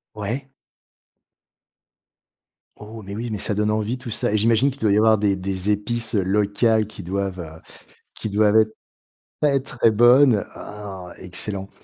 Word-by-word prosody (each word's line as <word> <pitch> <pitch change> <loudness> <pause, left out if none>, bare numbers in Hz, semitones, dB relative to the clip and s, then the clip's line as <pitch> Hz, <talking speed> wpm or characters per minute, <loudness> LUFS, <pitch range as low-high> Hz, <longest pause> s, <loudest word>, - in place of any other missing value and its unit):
Ouais. 115 +7 -4 2.3
Oh 110 +1 -10
mais 100 0 -8
oui, 115 +2 -4
mais 105 - -3
ça 105 - -2
donne 105 +1 0
envie 110 +3 -1
tout 125 -2 -8
ça, 105 - -1
et 110 - +3
j'imagine 115 +5 +3
qu'il 140 - -12
doit 110 -2 +2
y - - +3
avoir 110 0 +4
des 100 -1 +2
des 95 +1 -2
épices 115 +3 -2
locales 105 +3 +2
qui 105 -2 -10
doivent 90 -3 -4 0.5
qui 110 - -5
doivent 105 +1 +3
être 110 0 +3 0.7
pas 150 -2 +2
être 135 -2 -3
très 115 - +4
bonnes 120 +1 +5
oh! 100 -3 -8
Excellent! 95 +2 -4
105 Hz, 155 wpm, -22 LUFS, 100-115 Hz, 2.3 s, bonnes